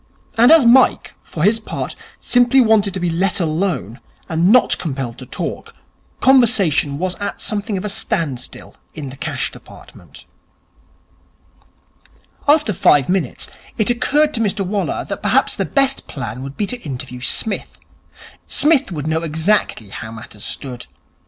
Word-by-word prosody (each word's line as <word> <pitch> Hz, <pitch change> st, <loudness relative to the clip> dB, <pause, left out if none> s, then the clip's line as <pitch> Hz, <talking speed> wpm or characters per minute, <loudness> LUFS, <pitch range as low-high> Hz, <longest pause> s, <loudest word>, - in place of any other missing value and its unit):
And 235 Hz, +4 st, +6 dB
as 320 Hz, -6 st, +7 dB
Mike, 250 Hz, +2 st, +4 dB
for 155 Hz, -, -5 dB
his 215 Hz, +4 st, +3 dB
part, 220 Hz, -, -5 dB, 0.2 s
simply 245 Hz, +2 st, +3 dB
wanted 220 Hz, -4 st, +4 dB
to -, -, -2 dB
be 175 Hz, -1 st, -1 dB
let 180 Hz, +4 st, 0 dB
alone, 160 Hz, -, -2 dB, 0.3 s
and 170 Hz, +3 st, +2 dB
not 250 Hz, +1 st, +4 dB
compelled 135 Hz, -7 st, -4 dB
to 130 Hz, -, -10 dB
talk, -, -, -5 dB, 0.5 s
conversation 215 Hz, -, +3 dB
was 180 Hz, +3 st, -1 dB
at 205 Hz, 0 st, -4 dB
something 210 Hz, -1 st, -2 dB
of 185 Hz, -, -5 dB
a -, -, -2 dB
standstill 185 Hz, -, -3 dB, 0.2 s
in 140 Hz, -4 st, -6 dB
the -, -, -10 dB
Cash 140 Hz, -, -3 dB
Department. -, -, -15 dB, 2.2 s
After 295 Hz, -7 st, +4 dB
five 145 Hz, -4 st, +3 dB
minutes, 180 Hz, -8 st, -1 dB, 0.3 s
it 215 Hz, +2 st, +2 dB
occurred 290 Hz, +5 st, +2 dB
to -, -, -2 dB
Mr 205 Hz, -2 st, 0 dB
Waller 200 Hz, +2 st, -2 dB
that -, -, -5 dB
perhaps -, -, +2 dB
the -, -, -1 dB
best 275 Hz, -1 st, +1 dB
plan 125 Hz, -3 st, -6 dB
would 135 Hz, +1 st, -8 dB
be 210 Hz, -, 0 dB
to 245 Hz, +4 st, -4 dB
interview 130 Hz, -3 st, -6 dB
Psmith. 210 Hz, -, -1 dB, 0.7 s
Psmith 290 Hz, -6 st, +2 dB
would 150 Hz, -4 st, -4 dB
know 160 Hz, +1 st, 0 dB
exactly 160 Hz, -, 0 dB
how 110 Hz, +3 st, -7 dB
matters 110 Hz, -2 st, -10 dB
stood. 125 Hz, -2 st, -5 dB
190 Hz, 150 wpm, -18 LUFS, 140-225 Hz, 2.2 s, as